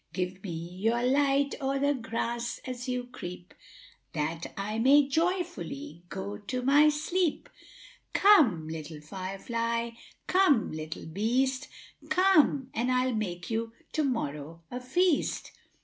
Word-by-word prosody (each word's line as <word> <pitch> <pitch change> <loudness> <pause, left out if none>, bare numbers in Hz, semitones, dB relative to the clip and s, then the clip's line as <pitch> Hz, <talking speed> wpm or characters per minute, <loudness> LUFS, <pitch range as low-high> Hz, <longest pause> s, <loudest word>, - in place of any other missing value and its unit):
= - - -38
```Give 185 0 -3
me 195 - -6
your 185 +8 -1
light 275 +2 +3
o'er 270 0 0
the 285 +1 +2
grass 235 -1 -3
as 255 0 -5
you 250 0 -1
creep, 180 -7 -9 0.6
```That 160 +2 -2
I 210 +3 -2
may 275 +4 +6
joyfully 320 - -2
go 200 +2 -5
to 250 +4 -4
my 290 +3 +6
sleep; 320 +3 0 0.7
```Come, 255 - +5
little 155 -1 -6
fire 185 +5 -6
fly, 230 +1 -2 0.3
come 365 - +3
little 155 0 -6
beast, 255 - 0 0.4
```Come! 310 -8 +3
and 245 +3 0
I'll 255 0 +2
make 180 -3 -3
you 225 0 -2 0.2
to 310 - +1
morrow 165 - -3
a 250 - -3
feast. 335 +6 +1
240 Hz, 135 wpm, -29 LUFS, 190-280 Hz, 0.7 s, may